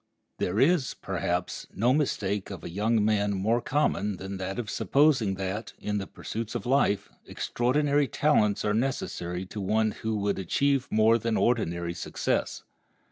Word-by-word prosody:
There 95 +4 0
is, 150 0 +3
perhaps, 90 +1 -3
no 120 +5 +3
mistake 105 -9 -1
of 100 - -8
a - - -6
young 105 +3 +1
man 105 -1 +2
more 110 +5 +1
common 105 -10 0
than 95 +1 -6
that 95 +1 -4
of 120 -3 -3
supposing 135 -7 +2
that, 95 +4 -4
in 105 0 -2
the 95 - -5
pursuits 115 0 -6
of - - -3
life, 125 -6 +2 0.2
extraordinary 140 +3 +1
talents 105 -11 +2
are 105 - +2
necessary 95 -7 -2
to 105 +2 -7
one 110 +3 +1
who 110 +1 -3
would 100 -1 -1
achieve 135 +8 +1
more 110 +2 +4
than 115 0 0
ordinary 85 -8 0
success. 85 - -2
110 Hz, 155 wpm, -27 LUFS, 95-120 Hz, 0.2 s, more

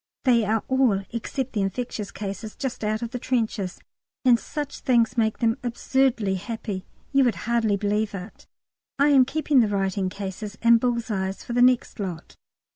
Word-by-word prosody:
They 235 -4 +4
are 220 +1 +1
all, 255 -7 +2
except 240 +3 -3
the 210 - 0
infectious 205 +1 -3
cases, 210 +2 -6
just 265 -4 -4
out 215 +2 -1
of 235 - -4
the 250 - -4
trenches, 220 -7 -1 0.5
and 240 -2 +6
such 290 +2 -5
things 240 -1 +2
make 220 -2 +1
them 230 0 +1
absurdly 240 -3 +1
happy; 200 -1 -5 0.2
you 275 -1 +4
would 240 -3 +2
hardly 230 -3 +2
believe 210 +1 -1
it. 195 +2 -9 0.5
I 285 +1 +4
am 270 -3 +6
keeping 295 0 +2
the 230 - +4
writing 195 -1 0
cases 205 +2 -6
and 235 0 +7
bull's 235 -1 -1
eyes 190 -1 -2
for 240 - -5
the 245 - +2
next 250 -2 +3
lot. 180 -5 -5
225 Hz, 175 wpm, -25 LUFS, 205-250 Hz, 0.5 s, and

